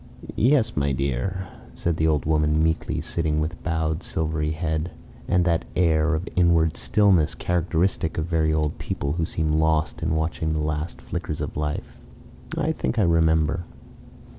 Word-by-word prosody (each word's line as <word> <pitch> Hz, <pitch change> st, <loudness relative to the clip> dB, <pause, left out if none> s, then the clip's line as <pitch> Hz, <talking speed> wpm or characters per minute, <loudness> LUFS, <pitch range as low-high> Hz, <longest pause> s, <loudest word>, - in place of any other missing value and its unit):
"Yes, 125 Hz, 0 st, +3 dB
my 70 Hz, -1 st, +1 dB
dear," 70 Hz, +9 st, -2 dB, 0.3 s
said 85 Hz, -1 st, -1 dB
the 80 Hz, -, +2 dB
old 75 Hz, -2 st, +1 dB
woman 75 Hz, 0 st, +2 dB
meekly, 80 Hz, 0 st, 0 dB
sitting 80 Hz, -2 st, -1 dB
with 80 Hz, +3 st, -3 dB
bowed 80 Hz, 0 st, -1 dB
silvery 80 Hz, -2 st, -2 dB
head, 80 Hz, +1 st, -2 dB, 0.4 s
and 90 Hz, -1 st, +2 dB
that 85 Hz, -2 st, +2 dB
air 80 Hz, -2 st, +3 dB
of 85 Hz, +6 st, -4 dB
inward 85 Hz, -3 st, +3 dB
stillness 95 Hz, -7 st, +3 dB
characteristic 85 Hz, -1 st, 0 dB
of 80 Hz, -, 0 dB
very 80 Hz, -2 st, +1 dB
old 75 Hz, -1 st, 0 dB
people 70 Hz, -, -3 dB
who 80 Hz, +1 st, 0 dB
seem 80 Hz, -2 st, 0 dB
lost 80 Hz, 0 st, +1 dB
in 80 Hz, 0 st, 0 dB
watching 80 Hz, 0 st, -1 dB
the 80 Hz, -, -1 dB
last 75 Hz, +2 st, -3 dB
flickers -, -, -4 dB
of -, -, -4 dB
life. 75 Hz, 0 st, -4 dB, 0.6 s
"I 155 Hz, -, +1 dB
think 140 Hz, -, -2 dB
I 110 Hz, -, +4 dB
remember." 80 Hz, 0 st, +2 dB
80 Hz, 160 wpm, -24 LUFS, 75-85 Hz, 0.6 s, I